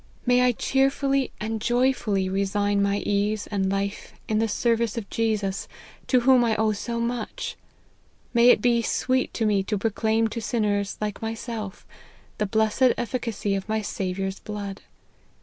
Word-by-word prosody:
May 250 0 +4
I 250 0 +5
cheerfully 270 +2 +1
and 220 0 -3
joyfully 240 -5 +1
resign 200 +1 +1
my 200 0 +1
ease 205 +1 0
and 195 -2 -1
life 200 +1 -3
in 215 -1 +1
the 225 - +2
service 230 +1 0
of 215 -3 -4
Jesus, 215 -4 -1 0.4
to 250 -2 +4
whom 255 0 +5
I 225 -2 +2
owe 220 0 +2
so 235 +3 -3
much! 235 -1 -3 0.8
May 235 0 +6
it 210 - +5
be 240 -1 +4
sweet 255 +2 0
to 225 - 0
me 205 -2 +3
to 210 +2 -2
proclaim 220 +2 +1
to 230 +1 -4
sinners 205 -3 -1
like 210 -1 -3
myself, 225 -2 -5 0.5
the 210 - +1
blessed 220 +5 +3
efficacy 230 -4 -2
of 195 +2 -3
my 220 0 0
Saviour's 190 0 -3
blood 200 -2 -6
220 Hz, 155 wpm, -25 LUFS, 200-235 Hz, 0.8 s, May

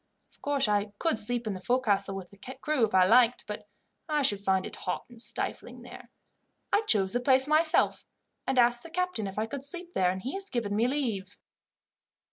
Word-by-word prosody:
Of - - -28
course 280 -3 +1
I 205 0 0
could 325 -5 +1
sleep 235 +2 -1
in 215 - -2
the 185 - -6
fo'castle 200 -5 +2
with 190 -2 -8
the 200 - -17 0.2
crew 300 -3 0
if 210 - -4
I 185 -1 +6
liked, 240 +3 +4
but 210 0 -7 0.4
I 300 -1 +1
should 205 -5 +1
find 190 -1 +1
it - - -8
hot 180 - -4
and 235 -2 -10
stifling - - -2
there. - - -12 0.6
I 410 - +4
chose 195 -2 +2
the 245 - +1
place 260 +1 +4
myself, 315 +1 +2 0.4
and 265 - 0
asked 240 0 +4
the 335 - -11
captain 360 - -2
if 195 - -8
I 215 - 0
could 265 +4 -6
sleep 350 +4 -6
there, 180 -1 +2
and 185 +1 -4
he 260 - -4
has 390 0 -3
given 225 -5 -2
me 225 +3 +2
leave." 225 -9 -3
235 Hz, 210 wpm, -28 LUFS, 205-280 Hz, 0.6 s, I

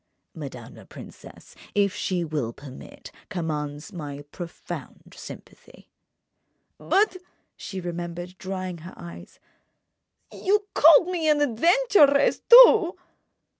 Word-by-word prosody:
"Madame - - -9
la - - -14
princesse—if 200 -2 -6
she 185 -3 -2
will 150 -8 -3
permit—commands 150 - -8
my 145 -4 -8
profound 175 -2 -9
sympathy." - - -14 0.9
"But," 395 -1 +1 0.4
she 195 - -8
remembered, 175 0 -7
drying 185 -2 -6
her 170 +4 -12
eyes, 170 -1 -12 0.9
"you 410 +2 0
called 320 +3 +6
me 335 -4 -1
an 300 -1 +3
adventuress, 290 - +3
too!" 455 -7 +7
190 Hz, 95 wpm, -24 LUFS, -, 0.9 s, too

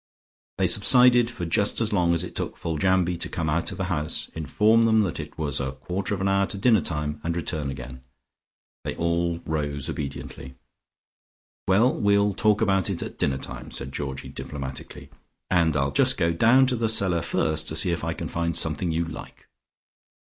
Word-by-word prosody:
They - - +1
subsided 125 -2 +5
for 95 -8 -6
just 100 +5 +1
as 110 -2 -1
long 85 -3 +2
as 85 - +1
it 90 - -8
took - - -4
Foljambe 90 +2 0
to - - 0
come 80 -3 -2
out 85 +2 -1
of - - -7
the 95 - -2
house, 80 -4 -1
inform 105 - +2
them 110 -1 +4
that 90 -6 -2
it 75 -1 -8
was 75 -3 -2
a 65 -1 -3
quarter 90 +10 -4
of 95 - -6
an 95 - +1
hour 100 0 +2
to - - -5
dinner 110 -1 +3
time, 75 -1 -4
and 85 0 -2
return 80 -4 -3
again. 65 -1 -8 0.8
They - - -4
all 85 0 -1
rose 75 -3 -2
obediently. 65 -2 -7 1.1
"Well, 110 +7 +4
we'll 100 -1 +2
talk 105 +2 +2
about 95 -2 +1
it 95 -3 -3
at - - -9
dinner 65 - 0
time," - - -8
said 70 - -2
Georgie 65 -2 -5
diplomatically. 65 0 -7 0.4
"And 85 -4 +2
I'll 70 0 0
just - - +3
go 85 0 +1
down 115 +10 +5
to 130 -1 0
the 115 -1 0
cellar 95 -6 +3
first 80 -2 0
to 80 - -3
see 90 +3 +4
if 85 - -3
I - - -2
can - - -5
find 85 0 -1
something 80 +2 0
you 85 +1 -1
like." 80 - -10
85 Hz, 190 wpm, -25 LUFS, 75-100 Hz, 1.1 s, subsided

